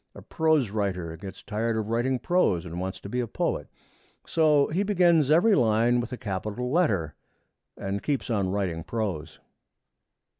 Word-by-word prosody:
A - - -11
prose 155 -9 +1
writer 90 -6 -2
gets 95 +3 -10
tired 110 +1 -1
of 110 -1 -3
writing 120 +3 +1
prose, 125 - +1
and 85 0 -6
wants 95 +1 -4
to - - -8
be 125 +5 -2
a 120 - -1
poet. - - -2 0.6
So 150 -3 +3
he 175 +5 0
begins 175 -7 +3
every 175 +8 +5
line 120 - +3
with 120 +1 -4
a 125 - -4
capital 105 +5 -4
letter, 100 - +1 0.6
and 100 +1 -3
keeps 145 -3 -2
on 100 -4 +1
writing 90 -4 -2
prose. 90 -9 -4
115 Hz, 160 wpm, -26 LUFS, 95-145 Hz, 0.6 s, every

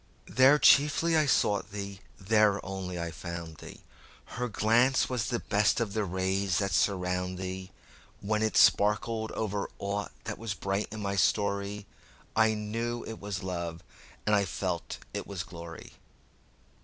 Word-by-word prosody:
There 130 +7 +5
chiefly 150 +3 +5
I 155 -2 +3
sought 105 -5 +2
thee, 100 -1 -6 0.2
there 105 0 +3
only 95 -2 -4
I 85 0 -3
found 85 -1 -7
thee; - - -12 0.5
Her 125 +1 -2
glance 115 +5 +3
was 125 -4 -1
the 120 - 0
best 105 +2 +2
of 110 -4 -2
the 110 - 0
rays 95 +1 0
that 100 -2 0
surround 90 0 0
thee; 95 0 -5 0.5
When 105 +1 -1
it 110 0 +1
sparkled 110 +2 +3
o'er 105 -2 -2
aught 100 +1 -3
that - - -5
was 110 -4 -3
bright 95 +2 -2
in 110 0 -6
my 100 0 -1
story,I 100 +3 0
knew 115 +3 -3
it 115 - -7
was 100 -1 -5
love, 85 -3 -4 0.4
and 105 - +4
I 100 - +3
felt 90 -1 -3 0.2
it - - -4
was 95 -3 -4
glory. 85 -3 -10
100 Hz, 150 wpm, -29 LUFS, 95-110 Hz, 0.5 s, There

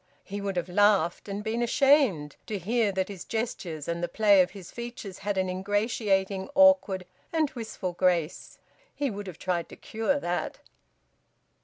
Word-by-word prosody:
He 200 +1 -6
would 200 -1 -3
have 175 0 -1
laughed, 195 -1 +2
and 200 +1 -4
been 225 +2 -1
ashamed 240 - +3
to 210 - -2
hear 215 +3 +1
that 190 -1 -1
his 195 -4 -8
gestures 180 - -4
and 170 0 -2
the 175 - 0
play 200 +1 +5
of 180 - +1
his 190 -4 -11
features 235 -5 -7
had 205 0 -2
an 190 0 +1
ingratiating, 195 0 0
awkward, 280 -10 +5 0.3
and 315 -3 +1
wistful 220 -6 -5
grace; 175 -3 0 0.4
he 285 -3 -1
would 205 0 -6
have 180 -4 -8
tried 175 -2 -2
to - - -10
cure 225 +6 -1
that. 175 -7 -3
200 Hz, 165 wpm, -27 LUFS, 185-225 Hz, 0.4 s, play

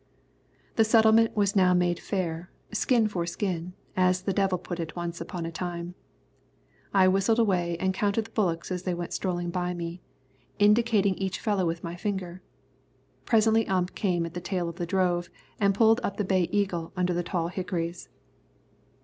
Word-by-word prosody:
The 225 - +6
settlement 220 0 +4
was 200 -1 +2
now 180 -2 +5
made 175 -1 +1
fair, 175 -3 -3 0.2
skin 225 +1 +2
for 175 -5 -3
skin, 180 -1 -3 0.2
as 185 0 +2
the 195 - -1
devil 190 -1 +1
put 175 0 -6
it 160 -2 -5
once 175 -1 -4
upon 175 -4 -5
a 165 - -4
time. 175 0 -5 1.0
I 190 -2 +5
whistled 195 +4 +3
away 180 -7 +1
and 190 0 +1
counted 205 +3 0
the - - -14
bullocks 175 -5 -1
as 180 -1 -2
they 180 -1 -2
went 175 0 -5
strolling 175 -2 -2
by 180 0 -2
me, 170 +1 -5 0.6
indicating 210 -1 +4
each 190 -1 -2
fellow 200 -5 0
with 165 0 -3
my 170 0 -5
finger. 185 -1 -4 0.8
Presently 225 -1 +3
Ump 185 -1 0
came 175 -4 0
at 165 - -7
the 175 - -5
tail 180 -1 -2
of 170 0 -6
the 175 -2 -3
drove 175 -1 +1 0.3
and 200 -2 +3
pulled 225 +2 +5
up 200 -4 -3
the 205 - 0
Bay 185 -2 +1
Eagle 185 -5 -1
under 180 0 +1
the 175 - 0
tall 170 -1 -2
hickories. 175 -2 -4
185 Hz, 175 wpm, -27 LUFS, 175-200 Hz, 1.0 s, The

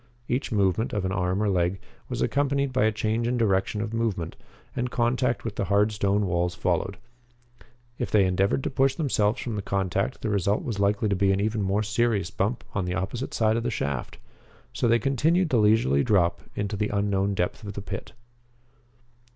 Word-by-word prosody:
Each 130 +2 -1
movement 100 +1 +1
of 100 -3 -1
an 95 - -1
arm 95 +1 0
or - - +1
leg 90 -1 +1 0.3
was - - -1
accompanied 140 -1 0
by 125 -4 +3
a 110 - +3
change 110 +2 -1
in 125 +1 0
direction 105 -1 +1
of 110 0 -4
movement, 105 -8 -2 0.4
and 125 0 -1
contact 120 +1 0
with 115 - -4
the - - 0
hard 105 +2 +3
stone 100 0 +1
walls 90 -1 0
followed. 100 +3 -1 1.0
If - - -2
they 100 -3 +4
endeavored 95 +7 +1
to - - -2
push 135 0 +2
themselves 120 -8 +1
from 120 -4 -4
the - - -2
contact 100 +4 -1
the 110 - 0
result 100 0 +1
was 110 -5 -3
likely 100 +2 +2
to 100 - +1
be 95 +1 +3
an 95 - +1
even 110 +1 0
more 100 +2 +1
serious 110 -3 0
bump 105 +5 -1
on 95 -2 -1
the 90 0 -2
opposite 100 +8 -3
side 110 0 +2
of - - 0
the 120 - 0
shaft. 70 - -3 0.6
So - - 0
they 115 0 +5
continued 155 - +2
the 125 - +2
leisurely 105 -11 +3
drop 90 -4 +2
into 105 0 -2
the 105 +1 -1
unknown 100 -1 0
depth 90 +5 -2
of 100 -1 -6
the 100 - -5
pit. - - -6
105 Hz, 200 wpm, -26 LUFS, 95-115 Hz, 1.0 s, they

